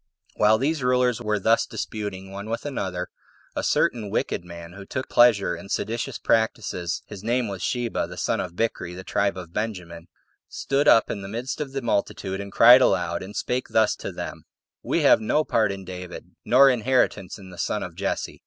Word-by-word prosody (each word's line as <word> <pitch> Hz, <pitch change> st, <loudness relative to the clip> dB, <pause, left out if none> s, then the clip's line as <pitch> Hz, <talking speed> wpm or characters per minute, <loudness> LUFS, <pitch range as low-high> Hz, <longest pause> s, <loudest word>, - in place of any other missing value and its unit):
6. -, -, -30 dB
While 105 Hz, +1 st, +5 dB
these 145 Hz, +5 st, -1 dB
rulers 125 Hz, -1 st, +2 dB
were 105 Hz, -2 st, 0 dB
thus 115 Hz, +4 st, +2 dB
disputing 100 Hz, -3 st, -5 dB
one 100 Hz, +2 st, -7 dB
with 115 Hz, +4 st, -3 dB
another, 95 Hz, -10 st, -3 dB, 0.5 s
a -, -, -1 dB
certain 110 Hz, -4 st, +1 dB
wicked 90 Hz, -, -1 dB
man, 85 Hz, -1 st, -10 dB
who 100 Hz, +1 st, -9 dB
took 130 Hz, +6 st, -4 dB
a -, -, -20 dB
pleasure 105 Hz, -7 st, +5 dB
in 100 Hz, +4 st, -11 dB
seditious 115 Hz, +5 st, -2 dB
practices, 110 Hz, -6 st, -1 dB
[his 105 Hz, -2 st, -10 dB
name 120 Hz, +1 st, 0 dB
was 95 Hz, -2 st, -6 dB
Sheba, 120 Hz, -2 st, -1 dB
the -, -, -10 dB
son -, -, 0 dB
of 85 Hz, -2 st, -5 dB
Bichri, 90 Hz, -5 st, -2 dB
of -, -, -9 dB
the 95 Hz, -, -7 dB
tribe 100 Hz, 0 st, 0 dB
of 85 Hz, -2 st, -9 dB
Benjamin,] 90 Hz, -6 st, -5 dB, 0.4 s
stood 140 Hz, +2 st, 0 dB
up 115 Hz, -, +5 dB
in 100 Hz, -, -4 dB
the 95 Hz, -, -7 dB
midst 120 Hz, +8 st, -4 dB
of 140 Hz, -3 st, -4 dB
the 135 Hz, -1 st, -4 dB
multitude, 100 Hz, -3 st, -1 dB
and 100 Hz, 0 st, -8 dB
cried 120 Hz, +5 st, +8 dB
aloud, 85 Hz, -7 st, +1 dB
and 95 Hz, +2 st, -9 dB
spake 125 Hz, +4 st, -2 dB
thus 110 Hz, -1 st, +2 dB
to -, -, -6 dB
them: -, -, -7 dB, 0.4 s
"We -, -, 0 dB
have -, -, +6 dB
no 150 Hz, +8 st, +1 dB
part 110 Hz, -8 st, +1 dB
in 95 Hz, -1 st, -7 dB
David, 90 Hz, -1 st, -8 dB
nor 135 Hz, +3 st, +6 dB
inheritance 120 Hz, -6 st, 0 dB
in 95 Hz, -2 st, -12 dB
the 85 Hz, -, -12 dB
son -, -, -1 dB
of -, -, -7 dB
Jesse." -, -, -3 dB
105 Hz, 205 wpm, -24 LUFS, 95-120 Hz, 0.5 s, cried